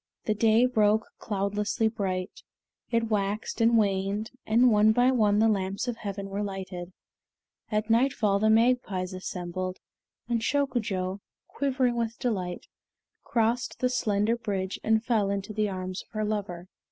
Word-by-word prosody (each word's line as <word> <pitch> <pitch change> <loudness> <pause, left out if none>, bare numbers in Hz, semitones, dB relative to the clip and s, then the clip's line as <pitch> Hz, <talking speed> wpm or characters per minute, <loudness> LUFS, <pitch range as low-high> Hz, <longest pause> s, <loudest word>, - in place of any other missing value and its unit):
The 215 - +2
day 225 +3 +4
broke 220 -3 +3
cloudlessly 205 +1 -1
bright. 190 -4 -3 0.5
It 230 -1 0
waxed 205 +3 -1
and 230 0 +5
waned, 200 +1 0 0.2
and 235 +3 +5
one 215 +1 +5
by 245 +3 +4
one 210 -5 +3
the 220 +1 +4
lamps 195 +1 -1
of 240 -2 -2
heaven 200 -3 -5
were 195 +1 -3
lighted. 190 -3 -5 0.8
At 215 +1 0
nightfall 225 -4 +2
the 215 +1 +3
magpies 220 -5 +2
assembled, 185 0 -4 0.5
and 235 -1 0
Shokujo, 220 -9 -1 0.3
quivering 260 -3 0
with 230 0 -2
delight, 185 -7 -2 0.6
crossed 235 +1 0
the 250 - +1
slender 215 -2 +1
bridge 200 -5 -3
and 220 +1 +2
fell 220 -5 +2
into 200 +1 -3
the 210 0 0
arms 185 -1 -4
of - - -21
her 215 -1 -1
lover. 195 -4 -3
210 Hz, 145 wpm, -27 LUFS, 195-230 Hz, 0.8 s, and